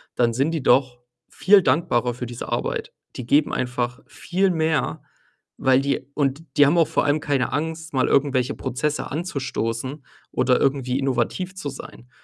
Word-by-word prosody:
dann 120 -1 +2
sind 135 +7 +1
die 160 -4 -3
doch 130 -2 +3 0.3
viel 200 +1 +5
dankbarer 125 -9 +1
für 125 +1 -6
diese 120 0 -7
Arbeit. - - -3 0.2
Die 125 - -5
geben 145 +4 +3
einfach 125 0 -2
viel 190 +2 0
mehr, 160 -3 0 0.6
weil 130 0 +3
die 140 -1 -2
und 140 +1 -1
die 145 - +7
haben 150 +5 +3
auch 165 -3 +4
vor - - 0
allem 145 +2 +2
keine 140 -3 -1
Angst, 160 +2 -3
mal 130 -1 +2
irgendwelche 135 -2 +2
Prozesse 145 +4 -3
anzustoßen 135 -4 -3 0.3
oder 125 -1 +2
irgendwie 135 -2 +1
innovativ 160 +7 -1
zu 165 -6 -6
sein. 130 -2 -11
140 Hz, 160 wpm, -23 LUFS, 125-155 Hz, 0.6 s, die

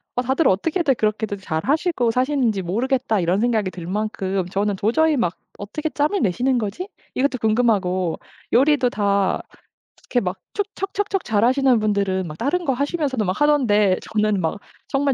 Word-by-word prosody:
'아 250 - +1
다들 265 +4 +1
어떻게들 305 - +1
그렇게들 215 -1 -1
잘하시고 245 - 0
사시는지 255 -5 +1
모르겠다.' 230 +4 0
이런 180 +3 +1
생각이 220 -5 +1
들 175 -3 -8
만큼 195 -2 -2
저는 200 +2 0
도저히 300 +11 +2
막 175 -6 0 0.2
'어떻게 300 +10 -4
짬을 300 +8 0
내시는 245 +7 +1
거지?' 240 - -4 0.3
이것도 265 0 +1
궁금하고 205 -6 +1 0.3
요리도 270 0 +4
다 200 -3 +1 0.7
이렇게 245 - +3
막 185 0 -3 0.2
척척척척 395 -1 -2
잘하시는 245 +3 +3
분들은 200 -3 0
막 155 0 -8
다른 340 +8 -1
거 270 - +2
하시면서도 280 -3 -1
막 185 +1 -2
하던데 210 -10 +3
저는 210 -2 +1
막 165 +5 -2 0.3
정말 275 0 +1
225 Hz, 360 characters per minute, -21 LUFS, 200-275 Hz, 0.7 s, 요리도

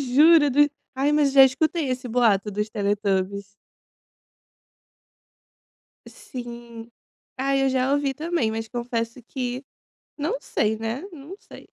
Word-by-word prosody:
Juro 310 -1 +7
do 290 +2 +4 0.3
ai, 280 +3 +1
mas 295 -2 +3
já 270 -1 +9
escutei 300 +2 +1
esse 255 0 -3
boato 220 -4 +2
dos 210 +2 -3
Teletubbies. 200 -2 -1 2.6
Sim. 235 -2 -10 0.5
Ai, 270 +1 +1
eu 270 - +2
já 260 +1 +1
ouvi 285 -1 0
também. 310 -6 -1
Mas, 225 0 -4
confesso 235 0 -4
que 250 +1 -5 0.5
não 290 -2 -2
sei, 220 -5 -1
né, 225 +5 -4
não 310 +3 -10
sei. - - -15
255 Hz, 125 wpm, -24 LUFS, 225-280 Hz, 2.6 s, já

